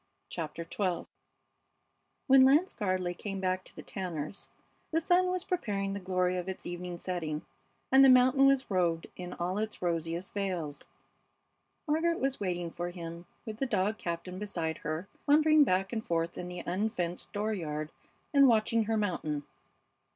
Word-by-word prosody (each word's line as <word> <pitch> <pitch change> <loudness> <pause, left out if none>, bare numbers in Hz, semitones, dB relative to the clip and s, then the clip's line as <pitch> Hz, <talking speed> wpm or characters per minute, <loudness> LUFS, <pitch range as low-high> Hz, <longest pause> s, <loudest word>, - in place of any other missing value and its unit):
CHAPTER 165 0 -4
XII 180 0 -2 1.2
When 270 -1 +7
Lance 290 +8 +5
Gardley 185 -4 -1
came 195 +1 -5
back 185 0 0
to - - -11
the - - -9
Tanners' 180 -2 -5 0.4
the 325 - +2
sun 355 +3 +3
was 365 0 -1
preparing 200 - -1
the 200 - -3
glory 185 -1 0
of 180 +1 -3
its 190 - -6
evening 175 0 -5
setting, 165 -4 -3 0.5
and 265 +1 +8
the 270 - +8
mountain 255 +2 +6
was 275 -4 +2
robed 170 -3 +1
in 180 0 -6
all 180 +3 -2
its 215 0 -3
rosiest 170 +1 -2
veils. 180 -7 -3 1.0
Margaret 330 +3 +1
was 270 0 0
waiting 175 -4 -2
for 175 +1 -4
him, 170 -1 -8 0.2
with 220 -2 -6
the 270 - -1
dog 210 -1 0
Captain 175 +2 -4
beside 170 -6 -3
her, 155 +5 -3 0.2
wandering 305 +1 +6
back 195 -3 +1
and 220 -1 -2
forth 165 0 -1
in 180 - -5
the 180 0 -6
unfenced 180 -2 -2
dooryard 165 -8 -2 0.4
and 280 -1 +7
watching 225 -1 +3
her 225 +1 0
mountain. 155 -8 -1
185 Hz, 160 wpm, -31 LUFS, 175-230 Hz, 1.2 s, and